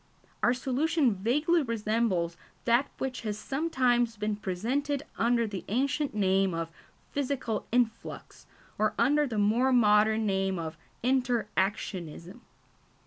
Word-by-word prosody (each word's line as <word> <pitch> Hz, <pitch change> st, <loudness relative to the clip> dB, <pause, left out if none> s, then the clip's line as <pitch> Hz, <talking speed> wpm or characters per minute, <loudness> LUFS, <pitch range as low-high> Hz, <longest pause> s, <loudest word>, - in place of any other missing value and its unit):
Our 240 Hz, -, +3 dB
solution 275 Hz, +1 st, +1 dB
vaguely 295 Hz, -, +2 dB
resembles 215 Hz, -, 0 dB, 0.3 s
that 240 Hz, +4 st, +3 dB
which 260 Hz, -2 st, -3 dB
has 210 Hz, -2 st, -3 dB
sometimes 250 Hz, -5 st, +1 dB
been 210 Hz, 0 st, -1 dB
presented 255 Hz, +10 st, -2 dB
under 235 Hz, 0 st, +2 dB
the 200 Hz, -4 st, -5 dB
ancient 275 Hz, +4 st, 0 dB
name 190 Hz, -2 st, +2 dB
of 165 Hz, 0 st, -3 dB, 0.4 s
physical 265 Hz, -5 st, -2 dB
influx, 235 Hz, -2 st, -2 dB, 0.3 s
or 215 Hz, 0 st, +1 dB
under 290 Hz, +5 st, +3 dB
the 225 Hz, -4 st, -4 dB
more 225 Hz, +6 st, +3 dB
modern 220 Hz, -2 st, +4 dB
name 195 Hz, -1 st, 0 dB
of 160 Hz, -1 st, -4 dB, 0.3 s
inter 250 Hz, -2 st, +1 dB
actionism. 190 Hz, -1 st, -3 dB
230 Hz, 120 wpm, -29 LUFS, 205-260 Hz, 0.4 s, modern